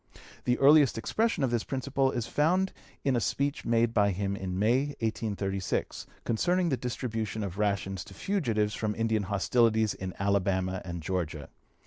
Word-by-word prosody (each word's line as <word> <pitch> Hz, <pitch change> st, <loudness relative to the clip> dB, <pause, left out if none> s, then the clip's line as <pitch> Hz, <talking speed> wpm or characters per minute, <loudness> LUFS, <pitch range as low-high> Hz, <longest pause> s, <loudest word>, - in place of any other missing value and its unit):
The 125 Hz, -, +2 dB
earliest 145 Hz, -3 st, +6 dB
expression 215 Hz, -, 0 dB
of 130 Hz, -, +1 dB
this 120 Hz, -2 st, 0 dB
principle 135 Hz, 0 st, 0 dB
is 120 Hz, -3 st, -2 dB
found 180 Hz, +9 st, +1 dB, 0.3 s
in 135 Hz, -3 st, +2 dB
a -, -, +3 dB
speech 140 Hz, +6 st, -1 dB
made 115 Hz, 0 st, +2 dB
by 105 Hz, -2 st, +4 dB
him 100 Hz, +1 st, -1 dB
in 95 Hz, -2 st, -4 dB
May, 130 Hz, +8 st, +2 dB
1836, 100 Hz, -4 st, -2 dB, 0.2 s
concerning 175 Hz, +10 st, +1 dB
the 135 Hz, -, +2 dB
distribution 115 Hz, -3 st, -3 dB
of 100 Hz, 0 st, -5 dB
rations 95 Hz, -3 st, -1 dB
to -, -, -13 dB
fugitives 115 Hz, -, 0 dB
from 105 Hz, -1 st, -2 dB
Indian 110 Hz, -1 st, +1 dB
hostilities 110 Hz, +2 st, +2 dB
in 95 Hz, -1 st, -6 dB
Alabama 95 Hz, -1 st, 0 dB
and 85 Hz, -3 st, -6 dB
Georgia. 80 Hz, -5 st, -3 dB
110 Hz, 155 wpm, -29 LUFS, 100-130 Hz, 0.3 s, earliest